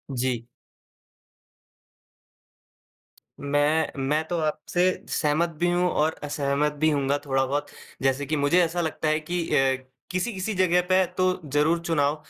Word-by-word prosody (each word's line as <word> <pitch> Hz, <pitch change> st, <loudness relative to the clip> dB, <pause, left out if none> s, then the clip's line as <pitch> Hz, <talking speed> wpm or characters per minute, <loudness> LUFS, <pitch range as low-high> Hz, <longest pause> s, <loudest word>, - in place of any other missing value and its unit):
जी। 120 Hz, -2 st, -1 dB, 2.9 s
मैं 145 Hz, +2 st, +1 dB
मैं 150 Hz, +4 st, +1 dB
तो 175 Hz, -, -2 dB
आपसे 155 Hz, +3 st, -1 dB, 0.3 s
सहमत 155 Hz, +3 st, +1 dB
भी 175 Hz, -, +2 dB
हूँ, 180 Hz, 0 st, +2 dB
और 155 Hz, +1 st, +1 dB
असहमत 145 Hz, 0 st, 0 dB
भी 155 Hz, -, +5 dB
होऊँगा 140 Hz, -1 st, +1 dB
थोड़ा 135 Hz, -1 st, +1 dB
बहुत। 145 Hz, +2 st, -2 dB, 0.3 s
जैसे 135 Hz, +1 st, +1 dB
कि 155 Hz, +3 st, -1 dB
मुझे 145 Hz, +5 st, +3 dB
ऐसा 170 Hz, +1 st, -1 dB
लगता 160 Hz, -1 st, -2 dB
है 155 Hz, 0 st, +2 dB
कि 175 Hz, +3 st, -3 dB
अ, 135 Hz, 0 st, +3 dB, 0.4 s
किसी-किसी 190 Hz, +2 st, -2 dB
जगह 180 Hz, -1 st, +3 dB
पे 185 Hz, 0 st, +5 dB
तो 185 Hz, -, +3 dB, 0.3 s
जरूर 160 Hz, +3 st, +3 dB
चुनाव 150 Hz, -3 st, +1 dB
155 Hz, 135 wpm, -25 LUFS, 145-175 Hz, 2.9 s, भी